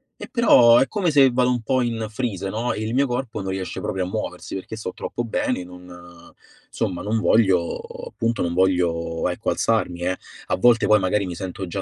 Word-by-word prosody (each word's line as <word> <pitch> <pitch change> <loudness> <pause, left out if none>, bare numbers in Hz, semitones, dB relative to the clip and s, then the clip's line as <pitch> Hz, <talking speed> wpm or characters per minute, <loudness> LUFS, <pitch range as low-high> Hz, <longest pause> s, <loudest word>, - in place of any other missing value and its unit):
e - - -10
però 120 - +6
è 135 - +3
come 195 -5 0
se 135 -3 +5
vado 125 0 +2
un 125 -1 0
po' 130 +1 +1
in 115 -2 -2
freeze, 105 -5 -3
no, 115 +4 -2
e 110 - -5
il 110 +2 -3
mio 140 +1 +2
corpo 125 -3 -3
non 95 - -4
riesce 95 -1 -4
proprio 95 -1 -2
a - - -5
muoversi, 95 - -5
perché 95 +3 -6
sto 95 -4 -5
troppo 120 - -4
bene, 110 -3 -1
non 90 0 -13 0.9
insomma 90 -1 -2
non 110 +2 -1
voglio 95 -7 +2 0.3
appunto 115 +1 -2
non 85 -1 -1
voglio 85 -3 +1
ecco 90 - -3
alzarmi, 85 0 0
eh. 90 +1 -1 0.3
A - - +1
volte 120 +2 +4
poi 105 0 +5
magari 95 +1 0
mi 90 -2 -5
sento 95 0 -6
già 95 +3 -4
105 Hz, 210 wpm, -22 LUFS, 90-120 Hz, 0.9 s, però